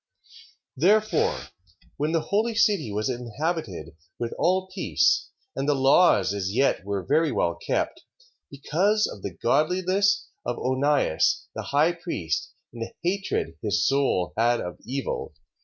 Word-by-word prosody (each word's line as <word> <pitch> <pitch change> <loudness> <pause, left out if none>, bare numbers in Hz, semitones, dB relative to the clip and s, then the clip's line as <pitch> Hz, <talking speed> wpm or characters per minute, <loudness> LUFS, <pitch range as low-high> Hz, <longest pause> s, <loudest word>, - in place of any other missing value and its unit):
Therefore, 210 +9 +2 0.5
when 150 +2 0
the 165 -1 +1
holy 220 +3 +1
city 200 - +2
was 105 +1 -1
inhabited 120 - -4 0.2
with 120 -1 -3
all 185 +1 +2
peace, 255 +7 +1 0.3
and 135 +2 -1
the 145 - +3
laws 135 - +4
as 95 -1 -2
yet 135 -6 +2
were 100 -2 -3
very 160 +2 +2
well - - +1
kept, - - -2 0.5
because 190 +10 +1
of 100 - -7
the 95 -2 -6
godliness 185 +9 +1 0.2
of 120 - -3
Onias, 130 - +1
the - - -6
high 150 +4 +3
priest 135 - -3 0.2
and 115 - -9
the 115 - -5
hatred 175 - -2
his 105 -1 +1
soul 135 - +1
had 120 +1 +2
of 90 0 -6
evil, 135 +3 -4
3:2. - - -43
140 Hz, 140 wpm, -25 LUFS, 110-180 Hz, 0.5 s, laws